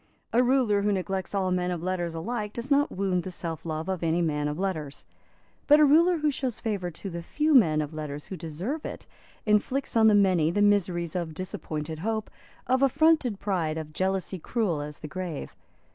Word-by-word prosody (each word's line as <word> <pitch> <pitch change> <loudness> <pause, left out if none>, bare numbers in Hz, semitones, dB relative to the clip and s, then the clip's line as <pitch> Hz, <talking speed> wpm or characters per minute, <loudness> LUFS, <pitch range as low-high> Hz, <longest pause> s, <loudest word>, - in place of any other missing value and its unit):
A 240 - +5
ruler 245 -5 +3
who 205 +1 +1
neglects 190 0 -2
all 190 -2 +1
men 180 0 0
of 175 -2 -3
letters 175 -2 -2
alike 210 +4 -3
does 240 +4 -6
not 285 +1 +3
wound 185 -2 0
the 185 - -6
self 165 -3 -5
love 155 +1 -3
of 190 -2 -2
any 165 0 +1
man 150 -3 0
of 150 0 -3
letters. 160 -7 -3 0.6
But 295 +1 +7
a 305 - +7
ruler 335 +5 +5
who 305 -1 +1
shows 260 -4 -3
favour 200 -5 -2
to 175 +4 -7
the 170 0 -5
few 300 - 0
men 160 - +5
of 150 +1 -8
letters 150 -1 -5
who 190 - -6
deserve 180 - -4
it - - -7 0.4
inflicts 230 +6 +1
on 220 -1 +6
the 215 - +6
many 185 -6 +4
the 205 +5 +2
miseries 180 -5 +1
of 170 -3 -3
disappointed 160 -3 -5
hope, 220 +3 -2 0.3
of 260 +1 +2
affronted 275 -5 +3
pride, 170 -6 -1
of 155 -1 -6
jealousy 190 +1 -1
cruel 180 -5 -1
as 150 0 -8
the 155 - -6
grave. 180 -3 -5
185 Hz, 200 wpm, -27 LUFS, 165-225 Hz, 0.6 s, But